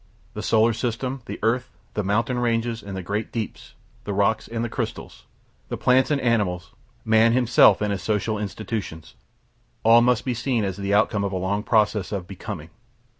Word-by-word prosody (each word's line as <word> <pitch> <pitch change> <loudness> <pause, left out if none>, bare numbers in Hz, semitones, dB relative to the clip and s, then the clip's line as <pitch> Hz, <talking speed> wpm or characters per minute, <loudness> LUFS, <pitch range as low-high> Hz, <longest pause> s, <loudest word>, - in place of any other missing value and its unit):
The - - -5
solar 115 +1 +3
system, 125 +3 -3
the - - -5
earth, 120 +3 +1 0.2
the 105 - -1
mountain 115 +5 0
ranges, 115 -1 0
and 100 -1 -7
the 95 - -5
great 105 +4 -3
deeps, 115 -2 -6 0.3
the 100 - -4
rocks 105 +2 +1
and 115 0 -3
crystals, - - -5 0.4
the - - -3
plants 130 +1 +3
and 145 -2 +1
animals, 100 -8 0 0.3
man 110 +1 +4
himself 125 -3 +5
and 105 -1 0
his 100 - -2
social 110 0 -1
institutions 105 -5 -5 0.7
all 115 +1 +7
must 125 -1 +2
be 130 - 0
seen 120 -1 -1
as 95 -2 -2
the 100 0 -3
outcome 105 0 +2
of 100 - -1
a 95 - -2
long 95 +3 -1
process 105 -3 +1
of 100 -4 -3
Becoming. 100 -3 -7
110 Hz, 175 wpm, -24 LUFS, 100-120 Hz, 0.7 s, all